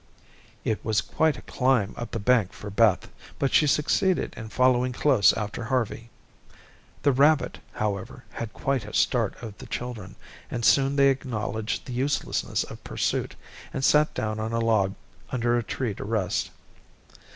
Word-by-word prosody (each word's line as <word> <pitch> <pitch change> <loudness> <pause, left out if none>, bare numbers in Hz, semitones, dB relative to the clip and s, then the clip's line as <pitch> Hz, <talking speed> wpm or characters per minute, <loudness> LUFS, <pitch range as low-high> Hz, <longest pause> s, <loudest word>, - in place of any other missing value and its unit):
It 110 - -1
was 110 -1 +1
quite 160 -1 +1
a - - -11
climb 125 -6 +1
up 120 -1 -6
the - - -3
bank 110 -2 +2
for 105 - -8
Beth, 105 -2 +3 0.3
but 135 - 0
she 150 - +5
succeeded 175 +6 +1
in 110 -2 -8
following 125 +2 +2
close 130 -6 +4
after 110 +2 -4
Harvey. 115 -1 -2 0.9
The 140 - +5
rabbit, 145 +3 +3
however, 100 -3 -3
had 115 -2 -5
quite 135 -1 -1
a 105 - -8
start 115 -6 +2
of 110 -3 -7
the - - -10
children, 120 -6 -6 0.3
and 120 -2 -2
soon 135 0 +4
they 140 -1 +5
acknowledged 115 -5 -2
the 125 - -6
uselessness 135 +3 -1
of - - -11
pursuit, - - -2 0.4
and 135 - -1
sat 150 +1 +4
down 110 0 -2
on 110 +1 -3
a 115 - +1
log 110 -4 +2 0.3
under 120 -1 +1
a 120 - +2
tree 115 -1 -3
to - - -7
rest. 105 -3 -1
120 Hz, 160 wpm, -26 LUFS, 110-135 Hz, 0.9 s, she